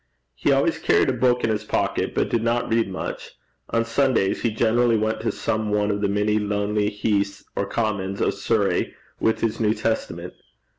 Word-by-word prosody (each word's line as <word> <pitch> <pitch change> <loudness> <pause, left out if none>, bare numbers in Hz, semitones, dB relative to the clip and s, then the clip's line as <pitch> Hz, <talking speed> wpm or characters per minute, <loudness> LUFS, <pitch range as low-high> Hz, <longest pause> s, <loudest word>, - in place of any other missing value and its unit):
He - - 0
always - - +2
carried - - +3
a - - +1
book 125 0 +2
in 115 - +2
his 105 - -1
pocket, - - -1
but - - +1
did 115 - +1
not 115 +1 0
read 115 -3 +2
much. 95 - -6 0.4
On 115 0 +1
Sundays 115 -4 +1
he 115 - +1
generally 115 +1 +2
went 110 +1 -1
to 115 - 0
some 110 0 -2
one 105 0 +1
of 100 0 -2
the 100 - +1
many 105 +1 +1
lonely 105 0 0
heaths 100 -1 -1
or 100 - -1
commons 100 -4 -2
of - - +1
Surrey - - 0 0.2
with 110 - +1
his 115 -2 -1
New 110 -1 +2
Testament. 90 -6 -3
110 Hz, 190 wpm, -23 LUFS, 105-115 Hz, 0.4 s, carried